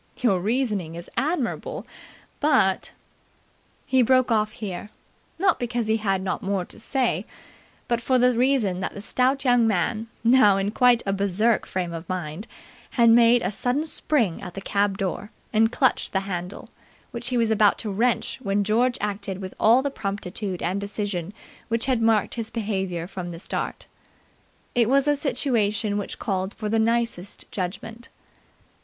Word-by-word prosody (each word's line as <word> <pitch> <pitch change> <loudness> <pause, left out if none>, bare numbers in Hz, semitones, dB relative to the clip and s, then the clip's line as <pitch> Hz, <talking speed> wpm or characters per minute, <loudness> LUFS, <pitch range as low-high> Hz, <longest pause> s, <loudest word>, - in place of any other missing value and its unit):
"Your 210 -8 +2
reasoning 210 -6 -1
is 170 +1 -9
admirable, 310 - -2 0.5
but 240 -11 +2 0.5
" - - -37 0.2
He 260 -1 +3
broke 255 0 +3
off 215 -1 +1
here, 205 -1 -6 0.5
not 375 +1 +2
because 240 -1 -1
he 220 +1 +2
had 195 -3 0
not 190 - -2
more 195 -2 -1
to - - -9
say, 255 +1 0 0.6
but 235 -1 0
for 255 +2 +2
the 250 0 +4
reason 240 -7 +2
that 190 - -4
the 200 - -7
stout 260 +4 +1
young 245 -2 +4
man, 215 +3 0 0.2
now 230 -5 +6
in 195 +1 -1
quite 245 0 +4
a 195 - 0
Berserk 200 +3 +1
frame 180 -2 -3
of 165 0 -7
mind, 180 +3 -4 0.5
made 235 0 +6
a - - 0
sudden 250 +8 0
spring 260 - 0
at 180 - -8
the - - -4
cab 200 0 0
door 195 +1 -3 0.2
and 225 +1 +4
clutched 260 0 +1
the 190 - +1
handle, 180 -1 -6 0.4
which 240 -1 -4
he 250 -1 0
was 230 -1 +2
about 210 -1 +4
to 215 - -4
wrench 235 +6 0
when 200 -3 0
George 240 +4 +2
acted 200 -2 -3
with 190 -1 -7
all 235 +4 +5
the 280 - -1
promptitude 195 -3 -4
and 190 +3 -1
decision 200 -3 -3 0.4
which 230 0 0
had 255 -3 +1
marked 225 -2 +2
his 230 -2 -4
behaviour 190 -6 -2
from 180 -1 -6
the 170 - -7
start. - - -4 0.9
It 235 -2 +3
was 275 +2 +3
a 295 - +4
situation 230 -7 0
which 200 - -5
called 190 -1 -2
for 215 -1 -4
the 225 +1 +2
nicest 230 -4 -1
judgment. 215 +5 -5
215 Hz, 165 wpm, -24 LUFS, 195-245 Hz, 0.9 s, now